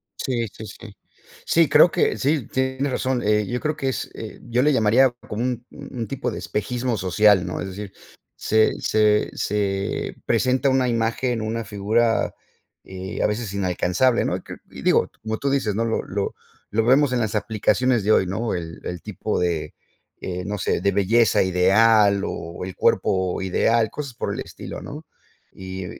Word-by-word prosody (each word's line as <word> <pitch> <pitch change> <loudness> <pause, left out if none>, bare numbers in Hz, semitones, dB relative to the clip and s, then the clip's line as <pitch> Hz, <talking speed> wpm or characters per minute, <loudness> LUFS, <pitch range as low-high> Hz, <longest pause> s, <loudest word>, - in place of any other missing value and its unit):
Sí, 120 -3 -2
sí, 110 +2 -10
sí. 105 +1 -11 0.5
Sí, 165 -3 +3
creo 155 +4 +6
que - - +1
sí, 140 -3 0
tienes 130 +1 -1
razón. 130 -1 -1
Eh, 105 0 +2
yo 125 +5 -2
creo 155 +2 -1
que 135 -2 -2
es 130 - -3
eh, 110 - -8
yo 120 +1 0
le 150 +3 +4
llamaría 125 +2 +4 0.2
como 110 +2 -3
un 125 -1 -2
un 115 -3 -7
tipo 135 0 -3
de - - -5
espejismo 120 +3 -2
social, 95 0 +4
¿no? 90 - -4
Es - - -4
decir, 100 +1 -8 0.4
se 110 0 +2
se 105 -1 +2
se 100 -1 -2
presenta 130 +2 +2
una 130 -1 +2
imagen, 115 +1 0
una 115 +1 -2
figura, 110 +3 +1 0.5
eh, 95 +1 -6
a - - +3
veces 105 -1 -3
inalcanzable, 95 +5 +1
¿no? - - 0
Y - - -10
cre - - -10
y - - -9
digo, - - +3
como 110 0 -3
tú 140 - -1
dices, 130 -7 0
¿no? 115 - 0
Lo 115 - 0
lo 100 +1 -3 0.4
lo 110 +1 +1
vemos 135 +3 +4
en 125 - +1
las 110 -2 -1
aplicaciones 110 +2 +1
de 105 - +2
hoy, 95 - +4
¿no? 110 +5 -2
El 80 -2 -6
el 90 -2 -5
tipo - - -3
de, 85 -4 -1 0.5
eh, 90 0 -4
no 105 +1 -3
sé, 95 - 0
de 100 - +2
belleza 110 +2 +3
ideal 100 +3 +4
o 85 +2 -6
el 95 - -7
cuerpo 95 -1 +1
ideal, 110 +4 +2
cosas 140 -4 -6
por - - -3
el - - -5
estilo, - - -8
¿no? 150 +3 -8 0.5
Y 95 0 -7
110 Hz, 180 wpm, -23 LUFS, 100-125 Hz, 0.5 s, creo